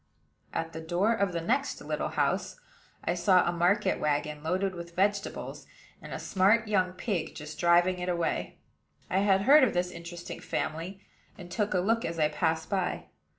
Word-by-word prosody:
At 165 0 -3
the 160 - -6
door 175 +7 +1
of 200 -4 0
the 170 -1 -2
next 270 - 0
little - - -2
house, - - -1 0.5
I - - +1
saw 180 +1 +4
a - - +2
market 185 +3 +2
wagon 150 0 -1
loaded 185 +4 -1
with 170 -1 -9
vegetables, 200 +1 -1 0.3
and - - -10
a - - -3
smart 210 +4 +2
young 185 -3 +1
pig 185 -2 -3
just 150 +1 -8
driving 175 +1 +4
it 180 0 -3
away. 170 -2 -1 0.5
I 190 - +3
had 195 -1 +3
heard 285 +4 +7
of 245 - +2
this 180 0 0
interesting 170 0 -8
family, 175 +5 -4 0.3
and 175 -3 -10
took 205 +2 0
a - - +3
look 225 +5 +1
as 165 0 -3
I 155 -1 +3
passed 160 +1 0
by. 190 -3 -2
180 Hz, 180 wpm, -29 LUFS, 170-200 Hz, 0.5 s, heard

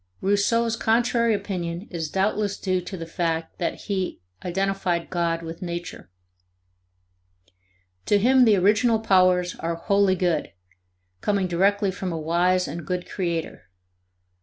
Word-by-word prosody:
Rousseau's 225 +4 +1
contrary 235 0 +2
opinion 180 -2 -4
is 165 -4 -3
doubtless 200 +2 0
due 185 -2 -1
to 185 +2 -7
the 165 - -6
fact 165 -1 -3
that 170 - -2
he 190 -3 -3 0.2
identified 185 -1 -1
God 170 -1 -1
with 165 0 -8
Nature; 175 - -6 2.0
to 205 - +4
him 255 +4 +5
the 220 -3 +5
original 215 +5 +3
powers 185 -4 +3
are 165 0 -2
wholly 200 +2 +2
good, 175 -4 -1 0.7
coming 200 -2 +1
directly 195 +3 +2
from 185 -1 -4
a 165 - -3
wise 175 +3 +1
and 160 +4 -6
good 180 +3 -3
creator. 170 -4 -3
185 Hz, 130 wpm, -24 LUFS, 170-205 Hz, 2.0 s, him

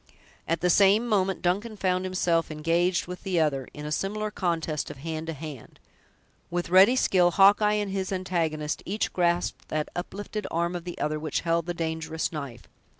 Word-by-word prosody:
At 165 0 0
the 180 - +2
same 200 +5 +5
moment, 195 -4 +1
Duncan 205 +5 -1
found 185 -1 0
himself 175 -3 +1
engaged 165 +3 +1
with 180 +1 -8
the 185 -3 0
other, 140 -5 0
in 150 - -8
a 150 - -4
similar 210 +6 -2
contest 165 -6 -2
of - - -8
hand 160 +2 -5
to 165 - -3
hand. 150 -5 -9 0.7
With 175 0 -3
ready 195 +7 +7
skill, 185 -8 +4
Hawkeye 205 +3 +5
and 205 -2 -1
his 190 -1 -2
antagonist 165 -5 -1
each 210 +4 -2
grasped 175 -1 0
that 155 -1 -2
uplifted 205 +3 -5
arm 170 +2 -1
of 175 -1 -5
the 175 - -6
other 150 0 -1
which 155 0 -2
held 170 0 0
the 175 - -2
dangerous 160 -1 -2
knife. 140 -7 -7
175 Hz, 180 wpm, -27 LUFS, 160-190 Hz, 0.7 s, ready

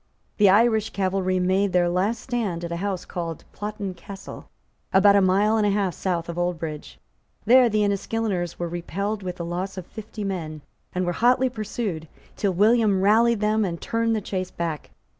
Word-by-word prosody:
The 205 -2 +6
Irish 220 +1 +4
cavalry 185 -1 0
made 190 +2 +1
their 175 -1 +3
last 195 +6 0
stand 220 -10 -2
at 170 - -6
a 170 - -2
house 190 -1 -3
called 165 -3 -5
Plottin 210 -2 -5
Castle, 195 +2 -10 0.4
about 200 +1 +6
a 200 - +5
mile 200 +4 +3
and 215 - +2
a - - +3
half 195 -3 0
south 175 -3 -2
of 170 0 -4
Oldbridge. 160 - -4 0.5
There 250 +1 +6
the 215 -1 +1
Enniskilleners 200 -3 -1
were 175 - -3
repelled 200 +5 -3
with 180 -2 -4
the 170 - -5
loss 185 +3 -4
of 185 - -6
fifty 215 +1 -8
men, 165 -6 -4 0.3
and 185 0 0
were 175 - 0
hotly 250 +5 +3
pursued, 210 -7 -4 0.3
till 200 - 0
William 210 -1 +4
rallied 225 +2 +4
them 215 +1 +2
and 170 -4 -3
turned 230 0 0
the 215 - -1
chase 185 -2 -3
back. 165 -5 -4
195 Hz, 180 wpm, -24 LUFS, 175-215 Hz, 0.5 s, The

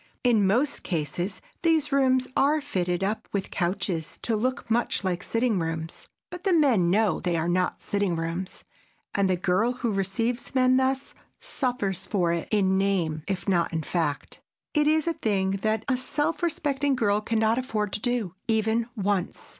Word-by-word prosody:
In 225 -6 +4
most 255 +9 +1
cases 175 +3 -3 0.2
these 320 -3 +2
rooms 260 -2 +3
are 295 +3 +3
fitted 180 -10 -1
up 210 +3 -2
with 200 -1 -3
couches 175 -2 -2
to 230 - 0
look 255 +4 -1
much 235 -2 +1
like 180 -2 -1
sitting 230 -2 0
rooms, 165 0 -5 0.2
but 355 0 -8
the 385 - +2
men 255 - +4
know 210 +2 +2
they 175 -2 -1
are 165 0 0
not 180 +1 0
sitting 200 -4 -1
rooms, 165 +3 -4 0.5
and 200 -1 +2
the 185 - +2
girl 185 +7 +1
who 240 -3 -2
receives 230 +7 -2
men 255 0 +4
thus 265 +1 0 0.2
suffers 200 - -2
for 175 -4 +1
it 170 - -3
in 190 -3 +2
name 175 -6 0
if 195 -1 -3
not 175 -3 +2
in 160 -1 -2
fact. 150 -3 -2 0.3
It 300 -1 +3
is 310 0 +3
a 335 - +1
thing 195 -8 0
that 220 0 0
a 260 -2 +2
self 295 +6 -1
respecting 285 -4 0
girl 210 -4 +2
can 225 +1 -1
not 220 +2 +2
afford 215 -6 -2
to - - -1
do, 240 -7 -1
even 225 +1 +1
once. 200 -3 -2
210 Hz, 175 wpm, -26 LUFS, 185-255 Hz, 0.5 s, In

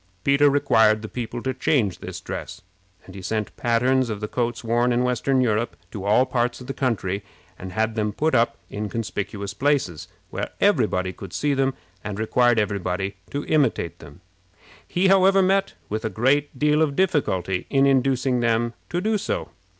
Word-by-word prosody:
Peter 140 +1 +4
required 115 -6 +3
the - - -4
people 120 0 -5
to 130 - -1
change 125 - +1
this - - -7
dress; - - -7 0.4
and 95 - -12
he 95 - -8
sent 105 +3 -3
patterns 125 +2 +2
of 105 -2 -3
the 105 - -3
coats 120 +1 -2
worn 120 +2 +2
in 120 +1 +2
western 125 +1 +1
Europe 115 -1 0 0.2
to 100 -2 -6
all 110 +5 +4
parts 120 -1 -1
of 125 - -10
the 135 - -4
country, 100 -7 -1 0.4
and 90 0 -7
had 110 +2 0
them 105 -1 -1
put 155 +9 0
up 115 +1 +2
in 105 0 -5
conspicuous 100 -3 -4
places, 115 - 0 0.2
where - - -3
every - - +4
body 90 0 -2
could 95 -3 -10
see 145 -1 0
them, 135 -1 +1 0.3
and 105 -1 -5
required 120 +2 +2
every 105 -1 0
body 95 +2 -3
to 145 +1 -4
imitate 140 - +1
them. 70 -2 -14 0.7
He, 185 +2 +1
however, 195 0 +5
met 195 +1 +1
with 110 +1 -3
a 110 - -1
great 135 +5 +1
deal 150 +2 +3
of 145 -3 +1
difficulty 95 - 0
in 135 -1 +3
inducing 130 -1 +2
them 115 0 +1 0.2
to 175 - -1
do 215 +1 +1
so. - - -3
120 Hz, 185 wpm, -23 LUFS, 105-140 Hz, 0.7 s, however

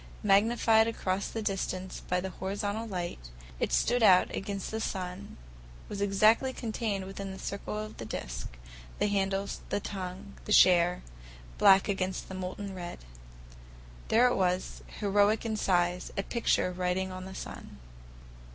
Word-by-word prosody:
Magnified 220 +2 +4
across 195 -4 -1
the 225 - -4
distance 190 -2 -3
by 180 - +1
the 190 +1 -4
horizontal 205 +4 -3
light, 175 - -5 0.3
it - - 0
stood 240 - +2
out 185 -4 +5
against 195 0 -4
the 220 0 -3
sun, 185 -1 -5 0.5
was 200 - -5
exactly 215 +6 +4
contained 215 -5 -3
within 195 +1 -6
the 190 - -8
circle 200 +2 -5
of 215 0 -6
the 115 - -6
disc; - - -6 0.4
the - - +1
handles, 195 -1 -1
the - - 0
tongue, 195 0 -6
the - - -5
share—black 60 - +3
against 190 -2 -2
the - - -6
molten 190 +2 -5
red. 175 -2 -6 1.1
There 235 +3 +5
it 250 - +3
was, 185 -1 0 0.2
heroic 205 +2 +3
in 220 -1 -1
size, 180 -3 +1
a 195 - 0
picture 230 -5 +1
writing 180 +1 -1
on 185 0 -7
the 190 0 -9
sun. - - -8
195 Hz, 145 wpm, -30 LUFS, 180-210 Hz, 1.1 s, out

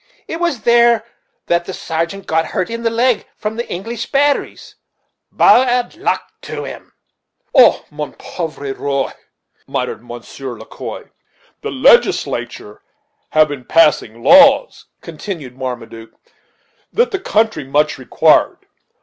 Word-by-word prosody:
It 325 - -5
was 340 -9 -1
there 235 -1 +4 0.4
that 170 0 0
the 190 - -6
sargeant 170 +4 -4
got 160 0 +1
the - - -7
hurt 185 - -3
in 230 0 -4
the 230 - +1
leg 235 0 +1
from 215 +1 -4
the 235 +1 -5
English 225 +6 -5
batteries, 285 +1 0 0.6
bad 250 +1 +3
luck 365 - -1 0.2
to - - -6
'em." - - -10 0.6
"Oh! 255 -4 +5
mon 150 0 -6
pauvre 155 -5 -6
roil" 140 -1 -2 0.5
muttered - - -3
Monsieur 120 +1 -8
Le - - -11
Quoi. - - -8 0.6
"The - - -4
Legislature 105 0 +1 0.5
have 155 -1 +3
been 140 -3 -6
passing 120 -8 +2
laws," 280 - +5
continued 155 -11 -7
Marmaduke, 115 -3 -7 0.7
"that 475 +2 +1
the 390 - -2
country 220 - 0
much 145 +2 0
required. 130 - +2
175 Hz, 130 wpm, -17 LUFS, -, 0.7 s, Oh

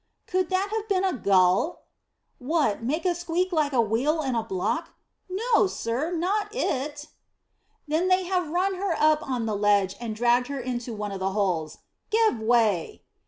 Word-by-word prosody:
"Could 370 -1 0
that 380 +2 0
have 440 0 -3
been 385 -1 +2
a 380 -2 +1
gull?" 195 - +2 0.6
"What, 280 -5 0
make 300 +10 -2
a 360 - +3
squeal 345 +1 -1
like 305 -4 +1
a 260 - +1
wheel 250 +9 +1
in 265 -2 -1
a 230 - +1
block? 225 - -3 0.3
No, 435 +2 +2
sir, 255 -1 -2
not 380 +5 0
it." 290 - -2 0.8
"Then 320 +5 +1
they 370 0 +3
have 360 -3 -1
run 370 +4 +1
her 385 -4 0
up 310 0 +4
on 255 -5 -2
the 215 -2 -1
ledge 200 -2 +2
and 230 -3 -4
dragged 240 +2 +2
her 280 -1 -4
into 245 -1 -4
one 210 -1 -4
of 195 - -5
the 190 0 -1
holes. 180 -7 -1 0.3
Give 440 - +2
way!" 220 -6 +1
285 Hz, 175 wpm, -26 LUFS, 225-360 Hz, 0.8 s, up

